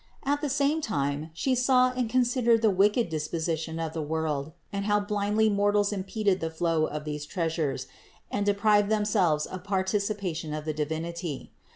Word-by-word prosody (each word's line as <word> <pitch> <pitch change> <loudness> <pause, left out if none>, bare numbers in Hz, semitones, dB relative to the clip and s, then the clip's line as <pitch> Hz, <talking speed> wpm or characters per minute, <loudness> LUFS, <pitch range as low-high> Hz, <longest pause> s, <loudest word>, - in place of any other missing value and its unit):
At 290 +1 0
the 295 - -1
same 285 +3 +1
time 145 - -2
She 260 +11 0
saw 255 0 +4
and 250 -2 -2
considered 240 -2 +3
the 220 - +5
wicked 205 +5 +3
disposition 160 0 -3
of 160 -1 -3
the 160 - -3
world, 155 -1 -2 0.2
and 200 0 -2
how 205 0 +3
blindly 205 +1 +1
mortals 205 0 +2
impeded 200 0 0
the 165 - -2
flow 160 -1 +1
of 150 0 -5
these 150 -1 -4
treasures 160 -5 -1 0.5
and 205 - 0
deprived 205 0 +3
themselves 205 -8 +2
of 185 - -7
participa 200 -1 -1
tion 155 -2 -4
of 155 0 -5
the 155 - -1
Divinity. 160 +1 -4
195 Hz, 170 wpm, -27 LUFS, 160-215 Hz, 0.5 s, the